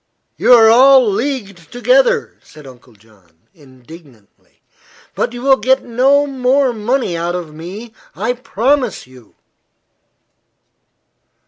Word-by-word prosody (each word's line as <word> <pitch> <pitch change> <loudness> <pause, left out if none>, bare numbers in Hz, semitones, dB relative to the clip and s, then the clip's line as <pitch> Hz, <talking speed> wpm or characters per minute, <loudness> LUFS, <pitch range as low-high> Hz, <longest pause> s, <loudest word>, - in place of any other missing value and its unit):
"You - - +3
are 225 -2 +6
all 255 +2 +5
leagued 200 - -5
together," - - 0
said 155 -2 -17
Uncle 125 -2 -17
John, 100 -6 -27
indignantly. 135 - -19 0.5
"But - - -3
you 245 0 -9
will 270 -1 +3
get 260 +5 0
no 270 +4 +1
more 265 -1 0
money 230 -3 -2
out 170 +1 -3
of 170 -4 -7
me, 195 +9 -10 0.2
I 220 +6 -2
promise 250 -1 -2
you." 125 -3 -20
225 Hz, 115 wpm, -15 LUFS, -, 0.5 s, are